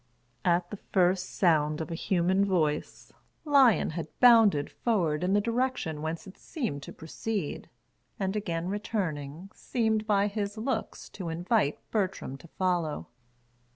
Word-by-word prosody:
At 175 0 +1
the 210 - -5
first 185 -1 +1
sound 155 -4 +2
of 160 +1 -4
a - - -2
human 185 +3 +1
voice, 160 -6 -1 0.3
Lion 275 - +5
had 160 0 -4
bounded 225 - +6
forward 175 -10 0
in 185 +2 +1
the 205 - +5
direction 230 -8 -1
whence 160 +1 -4
it 190 - -13
seemed 230 - -4
to - - -9
proceed, 185 +2 -4 0.5
and 190 +1 -1
again 170 -5 -2
returning, 185 -5 -3
seemed 220 -3 -1
by 200 -2 +3
his 205 0 -3
looks 250 +5 -3
to 180 -4 -6
invite 175 - +1
Bertram 190 - -1
to 170 - -15
follow. 170 - -1
185 Hz, 140 wpm, -29 LUFS, 160-215 Hz, 0.5 s, bounded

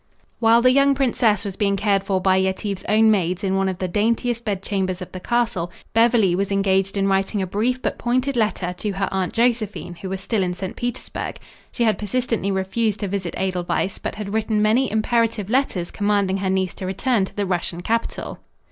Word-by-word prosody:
While 230 +1 +5
the 255 - +6
young 275 +1 +4
princess 245 -5 +2
was 195 -2 -4
being 200 -1 +1
cared 200 -1 +1
for 195 -1 0
by 190 0 +3
Yetive's 190 +1 -1
own 220 +1 +5
maids 185 -3 0
in 190 -1 +1
one 195 0 +1
of 185 - -4
the 185 - -2
daintiest 230 +5 0
bedchambers 195 -3 -2
of 180 - -8
the 185 - -6
castle, 230 -6 -1 0.2
Beverly 225 -5 +4
was 195 +2 -1
engaged 195 0 +1
in 195 0 +2
writing 195 +2 +1
a 190 - 0
brief 225 +7 0
but - - -2
pointed 255 +3 0
letter 210 -6 0
to 210 -2 -2
her 195 0 -1
Aunt 190 -1 -1
Josephine, 225 -6 0
who 190 - -5
was 190 0 -3
still 205 +2 -1
in 180 -1 -1
St. 185 0 -5
Petersburg. 245 -1 -4 0.3
She 240 - -1
had 220 -2 +2
persistently 225 -1 -1
refused 200 +3 -1
to 205 - -1
visit 190 -3 -3
Edelweiss, 185 0 -1
but - - -4
had 205 -1 -5
written 220 -1 0
many 220 +5 +3
imperative 220 -1 0
letters 240 -10 0
commanding 205 -2 +1
her 190 -1 -1
niece 190 -1 0
to 185 - -6
return 200 +2 +1
to - - -13
the 205 - -1
Russian 175 -2 -2
capital. 230 +5 -2
200 Hz, 200 wpm, -22 LUFS, 190-230 Hz, 0.3 s, the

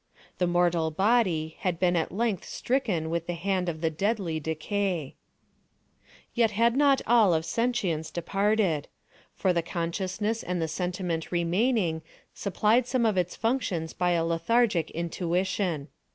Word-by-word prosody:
The 180 - +2
mortal 175 -2 +2
body 180 -4 +1
had 180 -3 -1
been 180 -1 +2
at 165 - 0
length 215 -1 -1
stricken 200 -12 -1
with 170 0 -2
the 175 - -2
hand 185 +1 -1
of 160 -2 -5
the 160 -1 +1
deadly 190 -2 -1
Decay. 160 +1 -2 1.2
Yet 235 -2 +3
had 230 +3 +2
not 280 -1 +4
all 220 -7 +5
of 160 0 -1
sentience 195 -10 -1
departed; 195 -3 0 0.5
for 185 -2 +1
the 170 - +1
consciousness 185 +6 -2
and 180 0 -3
the 165 - 0
sentiment 175 0 -3
remaining 175 0 +1 0.3
supplied 215 +5 +1
some 255 -2 +1
of 215 -3 +2
its 180 -1 0
functions 215 -9 -1
by 180 -1 +1
a 165 -1 +1
lethargic 170 +2 +1
intuition. 170 -1 -1
180 Hz, 140 wpm, -27 LUFS, 165-215 Hz, 1.2 s, all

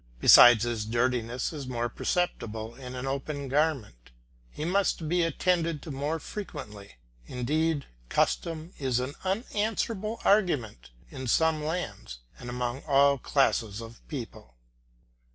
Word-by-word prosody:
Besides 120 - +9
his 115 -3 -2
dirtyness 120 +2 0
is 140 -4 -6
more 120 -1 -1
perceptible 115 -6 -2
in 125 0 -9
an 125 +1 -4
open 140 +1 -3
garment; 135 - -1 0.4
he 150 - -6
must 180 -3 +1
be 175 +3 +2
attended 165 -1 +1
to 160 - -7
more 145 +4 -2
frequently. 135 - -8 0.3
Indeed, 150 +4 -1 0.2
custom 165 +1 -1
is 130 -3 0
an 130 +3 -3
unanswerable 215 +1 -2
argument 145 - +1 0.2
in 130 -1 -6
some 160 +4 +2
lands 150 - -4 0.2
and 125 - -8
among 125 +1 -3
all 140 -1 +4
classes 115 -6 +1
of 115 0 -10
people. 115 - -8
135 Hz, 125 wpm, -28 LUFS, 120-165 Hz, 0.4 s, Besides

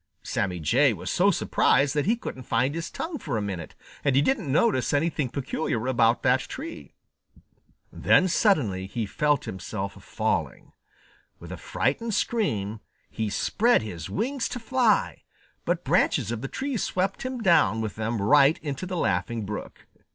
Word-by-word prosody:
Sammy 90 -2 -2
Jay 75 - +3
was - - -5
so - - +3
surprised 140 +1 +2
that 150 +2 0
he 225 - +4
couldn't 175 - -7
find 125 +3 0
his 165 +1 -4
tongue 320 -3 -5
for 135 -8 -3
a - - 0
minute, 95 -5 -5 0.3
and 140 -2 +2
he 135 - +5
didn't 205 - 0
notice 145 - +2
anything 145 -2 0
peculiar 130 -3 -2
about 120 -2 +2
that 130 0 +4
tree. 320 - -8 1.0
Then 185 - +4
suddenly 125 - +1
he 110 +3 -3
felt 145 +7 0
himself 95 +2 -6
falling. - - -2 0.7
With - - -10
a - - -4
frightened 195 - -1
scream, 110 - -1 0.3
he 110 -1 -2
spread 225 - +2
his 85 -7 -7
wings 255 +5 -2
to 245 - -5
fly, 235 -2 +1 0.4
but - - 0
branches 105 - +2
of 115 -2 -3
the 135 - -3
tree 265 - -3
swept 190 -1 -1
him 255 -1 -4
down 140 - +4
with 110 -3 -3
them 110 +1 -2
right 140 +8 +5
into 145 +4 -4
the 180 -1 -3
Laughing 110 - -1
Brook. 105 +1 -7
135 Hz, 160 wpm, -26 LUFS, -, 1.0 s, he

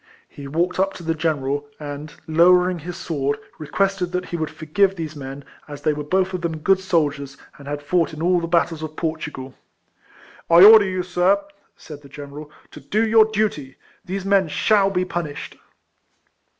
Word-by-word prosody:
He 140 -1 -10
walked 170 +6 -1
up 195 +1 +1
to 175 - -10
the 165 0 0
general, 145 -3 -2
and 145 0 -7
lowering 180 +2 +4
his 175 +3 -7
sword, 145 -3 -2 0.2
requested 185 +4 -1
that 180 0 -2
he 175 - -6
would 160 -2 -2
forgive 160 +6 0
these 160 -3 -6
men, 135 0 -8 0.2
as 145 -1 -9
they 155 -1 +2
were 150 0 -5
both 190 +5 0
of 180 - -3
them 165 -2 -3
good 190 +5 +2
sol 170 -6 +1
diers, 140 -1 -10 0.2
and 140 - -12
had 145 0 -5
fought 170 +2 +1
in 155 - -9
all 175 +2 +2
the 170 - -4
battles 165 -1 +1
of 155 -1 -6
Portugal. 150 -5 -5 0.5
" - - -25
I 170 +2 +8
order 215 0 +9
you^ 185 -2 -3
sir," 180 +2 +2 0.4
said 150 -2 -11
the 140 - -15
general, 145 +1 -9 0.2
"to - - -11
do 220 +2 0
your 220 0 +6
duty. 210 -11 -2 0.3
These 190 +1 -5
men 195 -2 +3
shall 200 +5 +2
be 185 -1 -1
punished." 170 -5 -5
165 Hz, 190 wpm, -21 LUFS, 150-185 Hz, 0.5 s, order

